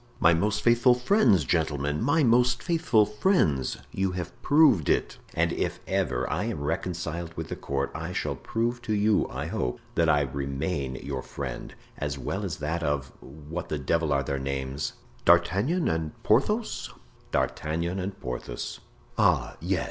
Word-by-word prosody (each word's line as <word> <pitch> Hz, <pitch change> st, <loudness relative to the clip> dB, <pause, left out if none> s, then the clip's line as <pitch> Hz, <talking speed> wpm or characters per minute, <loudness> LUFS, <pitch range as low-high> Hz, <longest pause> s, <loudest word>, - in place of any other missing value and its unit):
"My 85 Hz, -, +6 dB
most 105 Hz, +5 st, 0 dB
faithful 120 Hz, +1 st, +5 dB
friends, 125 Hz, -, +4 dB
gentlemen, 75 Hz, -1 st, 0 dB
my 145 Hz, +5 st, +3 dB
most 125 Hz, 0 st, +3 dB
faithful 160 Hz, -11 st, +3 dB
friends; 105 Hz, -, +1 dB
you 95 Hz, -1 st, -1 dB
have 90 Hz, -2 st, -4 dB
proved 145 Hz, -, +5 dB
it. -, -, +1 dB, 0.2 s
And -, -, +2 dB
if -, -, -2 dB
ever -, -, 0 dB
I -, -, -1 dB
am 70 Hz, -, -3 dB
reconciled 85 Hz, +1 st, -3 dB
with -, -, -4 dB
the -, -, -3 dB
court 70 Hz, 0 st, -2 dB
I 80 Hz, +2 st, -4 dB
shall -, -, -1 dB
prove 120 Hz, +1 st, -2 dB
to 110 Hz, -, -2 dB
you, 105 Hz, +1 st, +2 dB
I -, -, -4 dB
hope, 60 Hz, -, -2 dB
that -, -, +2 dB
I 75 Hz, -, +4 dB
remain 70 Hz, +1 st, -2 dB
your 70 Hz, 0 st, -4 dB
friend, 65 Hz, -3 st, -6 dB, 0.2 s
as 70 Hz, 0 st, -2 dB
well 95 Hz, +9 st, -3 dB
as 90 Hz, -6 st, -3 dB
that 80 Hz, +3 st, -2 dB
of—what 75 Hz, +2 st, -4 dB
the 75 Hz, -, -1 dB
devil 80 Hz, +3 st, 0 dB
are 70 Hz, -1 st, +2 dB
their 70 Hz, +1 st, -2 dB
names—D'Artagnan 85 Hz, -, 0 dB
and 80 Hz, -1 st, -2 dB
Porthos?" 210 Hz, -, +1 dB, 0.4 s
"D'Artagnan 85 Hz, +4 st, -1 dB
and 95 Hz, +2 st, -4 dB
Porthos." 60 Hz, -3 st, -5 dB, 0.4 s
"Ah, -, -, +3 dB
yes. -, -, 0 dB
85 Hz, 155 wpm, -27 LUFS, 70-110 Hz, 0.4 s, My